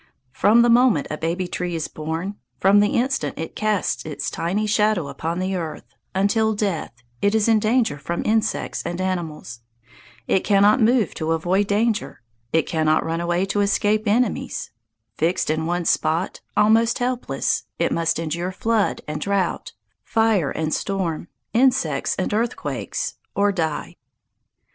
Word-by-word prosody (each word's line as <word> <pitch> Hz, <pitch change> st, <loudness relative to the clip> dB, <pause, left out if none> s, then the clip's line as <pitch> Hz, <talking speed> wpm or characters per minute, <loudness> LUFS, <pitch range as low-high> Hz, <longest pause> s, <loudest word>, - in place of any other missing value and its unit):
From 210 Hz, -, +4 dB
the 240 Hz, -, +3 dB
moment 240 Hz, -, +4 dB
a 155 Hz, -, -3 dB
baby 175 Hz, +3 st, -1 dB
tree 175 Hz, -1 st, -3 dB
is 160 Hz, -, -2 dB
born 165 Hz, +6 st, -4 dB, 0.2 s
from 195 Hz, +2 st, +5 dB
the 205 Hz, 0 st, +2 dB
instant 265 Hz, +3 st, -1 dB
it 160 Hz, -, -6 dB
casts 215 Hz, -2 st, 0 dB
its 155 Hz, -2 st, -4 dB
tiny 195 Hz, +6 st, -1 dB
shadow 210 Hz, -7 st, +1 dB
upon 160 Hz, +5 st, -3 dB
the 185 Hz, +1 st, -1 dB
ground 165 Hz, -4 st, -4 dB, 0.3 s
until 220 Hz, +3 st, +2 dB
death, 200 Hz, -6 st, -2 dB, 0.3 s
it 205 Hz, +2 st, +2 dB
is 220 Hz, 0 st, +2 dB
in 225 Hz, -1 st, +4 dB
danger 220 Hz, -, +1 dB
from 170 Hz, +4 st, -3 dB
insects 220 Hz, 0 st, 0 dB
and 175 Hz, +1 st, -4 dB
animals. 170 Hz, -10 st, -3 dB, 0.7 s
It 190 Hz, -, +2 dB
cannot 205 Hz, +4 st, +4 dB
move 230 Hz, -3 st, +3 dB
to 160 Hz, +1 st, -1 dB
avoid 180 Hz, +5 st, +1 dB
danger. 210 Hz, -, 0 dB, 0.3 s
It 160 Hz, -1 st, +2 dB
cannot 155 Hz, -1 st, +1 dB
run 165 Hz, +1 st, -2 dB
away 175 Hz, +2 st, 0 dB
to 205 Hz, +1 st, 0 dB
escape 210 Hz, +2 st, +1 dB
enemies. 230 Hz, +2 st, 0 dB, 0.5 s
Fixed 165 Hz, 0 st, +1 dB
in 160 Hz, +1 st, -1 dB
one 175 Hz, 0 st, -1 dB
spot, 165 Hz, +4 st, 0 dB, 0.2 s
almost 225 Hz, +2 st, +4 dB
helpless, 250 Hz, 0 st, -1 dB
it -, -, 0 dB
must 165 Hz, -1 st, +1 dB
endure 170 Hz, +3 st, -2 dB
flood 225 Hz, +2 st, 0 dB
and 150 Hz, 0 st, -4 dB
drought, 200 Hz, -2 st, -1 dB, 0.3 s
fire 220 Hz, -9 st, +2 dB
and 155 Hz, +1 st, -2 dB
storm, 180 Hz, -5 st, -2 dB, 0.3 s
insects 255 Hz, +2 st, +2 dB
and -, -, -2 dB
earthquakes, 230 Hz, +3 st, -2 dB, 0.2 s
or 200 Hz, 0 st, +3 dB
die. 160 Hz, -6 st, -3 dB
195 Hz, 150 wpm, -22 LUFS, 165-215 Hz, 0.7 s, from